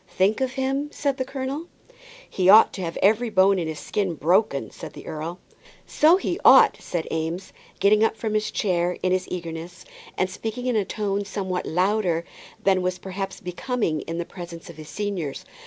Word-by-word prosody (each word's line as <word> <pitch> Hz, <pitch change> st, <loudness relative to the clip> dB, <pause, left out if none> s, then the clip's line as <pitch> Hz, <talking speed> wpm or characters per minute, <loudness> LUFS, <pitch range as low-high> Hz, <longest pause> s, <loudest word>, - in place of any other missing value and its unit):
"Think 195 Hz, +7 st, +1 dB
of 260 Hz, -1 st, 0 dB
him?" 270 Hz, +2 st, -1 dB
said 280 Hz, -3 st, -1 dB
the 260 Hz, -, 0 dB
colonel. 270 Hz, +4 st, -4 dB, 0.6 s
"He 185 Hz, -1 st, +1 dB
ought 215 Hz, +3 st, +8 dB
to 190 Hz, -, -5 dB
have 165 Hz, -2 st, -4 dB
every 220 Hz, +4 st, +3 dB
bone 195 Hz, -2 st, +4 dB
in 165 Hz, -, -2 dB
his 160 Hz, -1 st, -4 dB
skin 195 Hz, -5 st, -2 dB
broken," 160 Hz, -, +1 dB
said -, -, -9 dB
the -, -, -11 dB
earl. 160 Hz, +3 st, -5 dB, 0.5 s
"So 320 Hz, +4 st, +5 dB
he 365 Hz, -1 st, -2 dB
ought," -, -, +8 dB
said 170 Hz, -2 st, -3 dB
Eames, 165 Hz, +3 st, -3 dB, 0.3 s
getting 210 Hz, +2 st, +4 dB
up 225 Hz, -, +1 dB
from 215 Hz, 0 st, -3 dB
his 215 Hz, 0 st, 0 dB
chair 180 Hz, -3 st, 0 dB
in 185 Hz, -, +2 dB
his 185 Hz, 0 st, 0 dB
eagerness, 170 Hz, 0 st, -6 dB, 0.3 s
and 185 Hz, -, +2 dB
speaking 225 Hz, +6 st, -5 dB
in 250 Hz, -2 st, +1 dB
a 210 Hz, -3 st, +2 dB
tone 205 Hz, 0 st, -2 dB
somewhat 190 Hz, -2 st, -3 dB
louder 180 Hz, -1 st, +1 dB, 0.4 s
than 190 Hz, -1 st, +3 dB
was 180 Hz, 0 st, -1 dB
perhaps 195 Hz, 0 st, -5 dB
becoming 180 Hz, -, -2 dB
in 165 Hz, -, -5 dB
the 170 Hz, -, -2 dB
presence 170 Hz, -2 st, -9 dB
of 165 Hz, -, -17 dB
his 155 Hz, -1 st, -10 dB
seniors. 195 Hz, -9 st, -4 dB
190 Hz, 190 wpm, -24 LUFS, 175-220 Hz, 0.6 s, ought